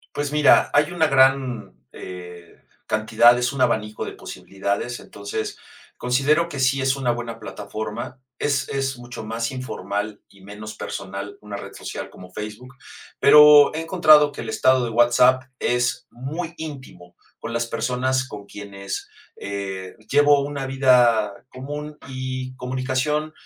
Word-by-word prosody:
Pues 145 Hz, 0 st, -2 dB
mira, 150 Hz, 0 st, +5 dB
hay 145 Hz, +4 st, +3 dB
una 165 Hz, -2 st, +2 dB
gran, 130 Hz, -, +2 dB, 0.2 s
eh, 90 Hz, -2 st, -10 dB, 0.3 s
cantidad, 110 Hz, +2 st, +4 dB
es 125 Hz, +1 st, 0 dB
un 135 Hz, -, 0 dB
abanico 105 Hz, 0 st, 0 dB
de -, -, -6 dB
posibilidades, 100 Hz, +5 st, -4 dB
entonces 100 Hz, +2 st, -6 dB, 0.4 s
considero 140 Hz, +7 st, +1 dB
que 140 Hz, -4 st, -5 dB
sí 135 Hz, +1 st, +2 dB
es 135 Hz, 0 st, +1 dB
una 125 Hz, -3 st, 0 dB
buena 120 Hz, -1 st, -6 dB
plataforma. 110 Hz, +5 st, -6 dB, 0.2 s
Es 140 Hz, -3 st, 0 dB
es 135 Hz, -2 st, -2 dB
mucho 120 Hz, -2 st, -8 dB
más 115 Hz, +1 st, -3 dB
informal 105 Hz, -4 st, -4 dB
y 100 Hz, -, -20 dB
menos 105 Hz, +2 st, -9 dB
personal 100 Hz, 0 st, -6 dB
una 105 Hz, -1 st, -7 dB
red -, -, -9 dB
social -, -, -7 dB
como 90 Hz, 0 st, -13 dB
Facebook, 105 Hz, +6 st, -8 dB, 0.5 s
pero 150 Hz, -1 st, +8 dB
he 160 Hz, -, -2 dB
encontrado 155 Hz, -4 st, +5 dB
que -, -, -7 dB
el 115 Hz, -, -7 dB
estado 130 Hz, -1 st, +3 dB
de 115 Hz, -, -3 dB
WhatsApp 120 Hz, +2 st, +4 dB, 0.2 s
es 120 Hz, 0 st, 0 dB
muy 155 Hz, +7 st, -5 dB
íntimo 130 Hz, -, -9 dB, 0.2 s
con -, -, -6 dB
las 115 Hz, 0 st, 0 dB
personas 125 Hz, +3 st, -1 dB
con 105 Hz, -3 st, -9 dB
quienes, 100 Hz, -1 st, -7 dB, 0.3 s
eh, 95 Hz, -2 st, -6 dB, 0.2 s
llevo 145 Hz, 0 st, +5 dB
una 140 Hz, -1 st, -4 dB
vida 125 Hz, -5 st, +4 dB, 0.2 s
común 150 Hz, +3 st, -7 dB
y 130 Hz, 0 st, -5 dB
comunicación 130 Hz, +4 st, -2 dB
125 Hz, 145 wpm, -22 LUFS, 105-135 Hz, 0.5 s, pero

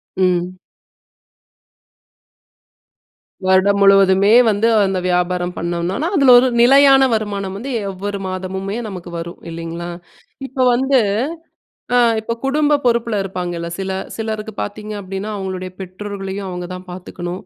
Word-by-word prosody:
ம். 180 Hz, -1 st, 0 dB, 2.9 s
வருடம் 195 Hz, +2 st, +3 dB
முழுவதுமே 195 Hz, +1 st, +5 dB, 0.2 s
வந்து 210 Hz, +2 st, +2 dB, 0.2 s
அந்த 190 Hz, -1 st, -1 dB
வியாபாரம் 180 Hz, 0 st, 0 dB
பண்ணோன்னா, 175 Hz, -, -2 dB
அதுல 265 Hz, -3 st, +6 dB
ஒரு 260 Hz, -, +2 dB
நிலையான 270 Hz, +1 st, +6 dB
வருமானம் 200 Hz, -3 st, -3 dB
வந்து 265 Hz, +5 st, -6 dB, 0.2 s
எவ்வொரு 200 Hz, +1 st, -5 dB
மாதமுமே 190 Hz, +3 st, -4 dB
நமக்கு 180 Hz, -2 st, -8 dB
வரும் 170 Hz, +1 st, -8 dB
இல்லைங்களா? 170 Hz, +1 st, -6 dB, 0.6 s
இப்போ 265 Hz, 0 st, -3 dB
வந்து 265 Hz, +1 st, +3 dB, 1.0 s
அ -, -, +5 dB, 0.2 s
இப்போ 225 Hz, +1 st, -3 dB
குடும்ப 295 Hz, +2 st, +2 dB
பொறுப்புல 235 Hz, -2 st, +1 dB
இருப்பாங்கல்ல, 175 Hz, -3 st, -4 dB
சில 190 Hz, 0 st, -3 dB, 0.2 s
சிலருக்கு 220 Hz, -1 st, -4 dB
பாத்தீங்க 210 Hz, +1 st, -5 dB
அப்டின்னா, 195 Hz, +2 st, -5 dB
அவுங்களுடைய 185 Hz, -1 st, -5 dB
பெற்றோர்களையும் 195 Hz, +1 st, -6 dB
அவுங்கதான் 180 Hz, 0 st, -6 dB
பாத்துக்கணும், 180 Hz, 0 st, -7 dB
195 Hz, 110 wpm, -18 LUFS, 180-220 Hz, 2.9 s, அதுல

